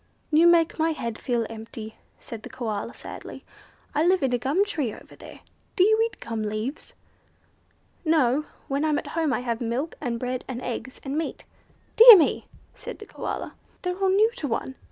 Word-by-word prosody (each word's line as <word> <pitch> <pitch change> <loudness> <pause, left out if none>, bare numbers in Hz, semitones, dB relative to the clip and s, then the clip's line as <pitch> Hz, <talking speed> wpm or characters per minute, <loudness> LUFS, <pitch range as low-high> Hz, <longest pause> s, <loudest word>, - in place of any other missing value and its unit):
"You 320 +3 +6
make 335 -1 +4
my 320 +1 +2
head 235 -7 -5
feel 240 -3 -1
empty," 220 0 -9 0.2
said 230 -2 -9
the - - -10
Koala, 220 -2 -4
sadly. - - -9 0.5
"I 300 - +2
live 360 -2 +3
in 265 - +1
the 245 - +1
gum 300 +11 +1
tree 300 - -2
over - - -13
there. - - -13 0.3
Do 365 - +5
you 435 +2 +4
eat 460 - -4
gum 225 -1 -4
leaves?" 215 +7 -4 1.1
"No. 305 -3 +2 0.2
When 280 +2 -1
I'm 305 -2 +2
at - - -4
home 325 -3 +1
I 250 - 0
have 235 -2 -3
milk, 245 +7 -2
and 240 -5 -2
bread, 255 +1 -3
and 255 -2 -5
eggs, 255 +1 -5
and 280 +2 -2
meat." 325 - -5 0.5
"Dear 460 -1 +12
me!" 315 - +1 0.3
said - - -8
the 430 - -10
Koala. - - -5 0.3
"They're 360 -1 -1
all 385 -1 +2
new 420 +4 +4
to 295 - -3
one. 250 +2 -3
275 Hz, 190 wpm, -25 LUFS, 235-330 Hz, 1.1 s, Dear